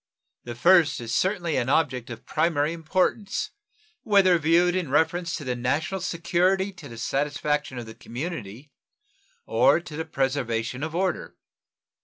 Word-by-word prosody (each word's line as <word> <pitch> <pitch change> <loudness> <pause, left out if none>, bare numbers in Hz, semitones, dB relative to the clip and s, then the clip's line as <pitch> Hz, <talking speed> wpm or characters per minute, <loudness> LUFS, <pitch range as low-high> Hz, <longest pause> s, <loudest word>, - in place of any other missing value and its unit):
The 120 -1 -6
first 170 +3 +4
is 115 -1 -5
certainly 180 -2 0
an 120 - 0
object 130 -5 +1
of 115 +1 -9
primary 155 -1 +1
importance 185 +5 -1 0.5
whether 190 -4 +4
viewed 170 +3 +3
in 180 -6 -1
reference 165 +4 +1
to 155 - -6
the 125 -2 -2
national 155 +10 -1
security 185 +3 +1
to 170 -6 -11
the 115 - -10
satisfaction 145 +2 -1
of 120 - -5
the 110 - -10
community 130 - -7 0.7
or - - +4
to 165 -3 -10
the 160 +1 -3
preservation 130 -4 -1
of 160 +1 -4
order. 185 0 -1
155 Hz, 145 wpm, -25 LUFS, 130-175 Hz, 0.7 s, first